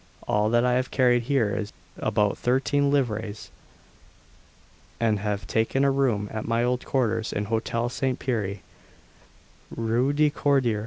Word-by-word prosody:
All 105 +1 +2
that 120 +1 +3
I 125 - +2
have 125 +1 0
carried 125 -2 +3
here 120 -7 +1
is 105 -1 -4 0.3
about 105 -1 +1
13 140 +3 +1
livres, 110 -6 -2 1.5
and 110 -3 +1
have 100 -1 -3
taken 115 +6 0
a 140 - +4
room 125 -7 +1
at 110 -1 -5
my 115 +1 +1
old 125 0 0
quarters 115 -4 0
in 105 - -2
Hotel 115 +2 -1
St. 130 +1 -2
Pierre, 105 -6 -2 1.1
Rue 115 +4 0
de 150 +1 +2
Cordier. 135 -7 +1
115 Hz, 145 wpm, -25 LUFS, 110-130 Hz, 1.5 s, a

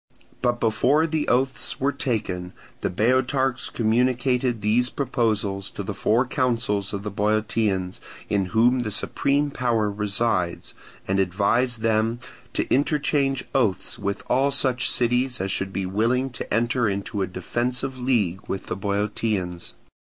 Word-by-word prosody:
But 120 0 +1
before 130 +8 +3
the 155 -2 -1
oaths 130 +2 0
were 140 +2 +2
taken 95 -10 -3 0.3
the - - 0
Boeotarchs 130 +5 +1
communicated 125 +1 +1
these 115 +4 +2
proposals 110 -8 -1
to - - -6
the - - -4
four 120 +4 +2
councils 115 -6 0
of 100 -1 -4
the 105 - -4
Boeotians, 105 -2 0 0.3
in 100 -2 +1
whom 115 +6 +3
the 120 -3 -2
supreme 140 +7 0
power 115 -6 +1
resides, 100 -3 -1 0.3
and 95 +1 +1
advised 110 +6 +1
them 115 +1 +1 0.3
to - - -1
interchange 140 -1 +1
oaths 110 -9 +1
with 100 -1 -3
all 135 +3 +3
such 130 -3 +1
cities 125 +1 +1
as 95 +1 -1
should 95 0 -1
be 95 0 -2
willing 120 +7 +1
to 120 - -7
enter 120 +1 +2
into 100 +1 -3
a 95 - 0
defensive 125 +6 -3
league 105 -8 +1
with 95 - -4
the - - -3
Boeotians. 100 -2 -2
115 Hz, 140 wpm, -24 LUFS, 100-125 Hz, 0.3 s, before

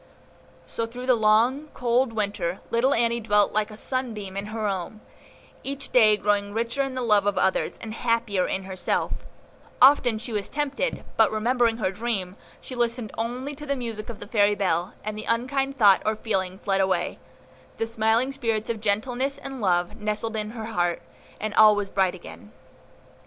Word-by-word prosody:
So, 230 - -3
through 250 +2 -7
the 255 - +5
long, 235 +6 +3
cold 245 0 +1
Winter, 200 -5 -2
little 255 +4 +3
Annie 235 0 +2
dwelt 210 -2 +2
like 215 0 0
a 215 - -10
sunbeam 220 -7 -4
in 200 +1 -4
her 215 0 -3
home, 195 +2 -4 0.6
each 275 0 -5
day 215 -4 +6
growing 205 0 0
richer 230 +4 -1
in 270 -1 -2
the 255 - -2
love 210 -3 +3
of 205 - +1
others, 190 - +1
and 220 -1 -6
happier 230 -5 0
in 190 - -2
herself; 190 -1 -2 0.7
often 255 -3 +6
was 220 - -6
she 220 -4 -2
tempted, 295 - -2
but, 220 -2 +5
remembering 230 +1 +1
her 190 -5 0
dream, 195 -3 -3 0.2
she - - -9
listened 235 -2 -1
only 250 +5 -3
to 295 +1 -9
the 280 - 0
music 230 -4 -5
of 230 - -7
the - - -8
fairy 205 -1 +3
bell, 180 -2 -1
and 215 0 -4
the 215 - -6
unkind 270 +4 0
thought 205 -5 +6
or 215 - 0
feeling 190 -4 -2
fled 195 -1 0
away, 185 -2 0 0.6
the 225 - 0
smiling 225 +3 +1
spirits 230 -5 -1
of 220 -2 -5
gentleness 245 +6 0
and 270 -2 -7
love 175 -3 +1
nestled 215 +1 -2
in 215 -1 -2
her 225 -1 -6
heart, 175 -6 0 0.4
and 215 0 -3
all 215 -1 +7
was 205 -1 -3
bright 190 -2 +1
again. 100 - -12
220 Hz, 180 wpm, -25 LUFS, 205-240 Hz, 0.7 s, all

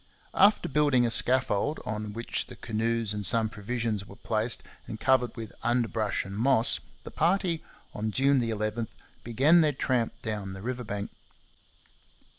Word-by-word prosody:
After 205 +2 +4
building 145 -4 +3
a 115 - 0
scaffold, 130 +3 +2
on 105 -1 -4
which 115 +2 -3
the - - -10
canoes 115 0 -1
and 105 -1 -4
some 110 +3 +3
provisions 110 0 -3
were 100 - -13
placed 110 +1 0 0.2
and 110 - -6
covered 130 -3 +2
with 115 -2 -7
underbrush 115 -3 0
and 100 0 -7
moss, 120 +1 +2 0.2
the - - -9
party, 175 -2 +1 0.3
on 110 +1 -2
June 135 +4 +3
11, 110 0 -2 0.4
began 140 +9 +4
their 150 -2 +2
tramp 125 -3 -1
down 105 -4 -4
the 95 0 -9
river 125 +1 -3
bank. 105 -2 -5
115 Hz, 150 wpm, -28 LUFS, 105-130 Hz, 0.4 s, After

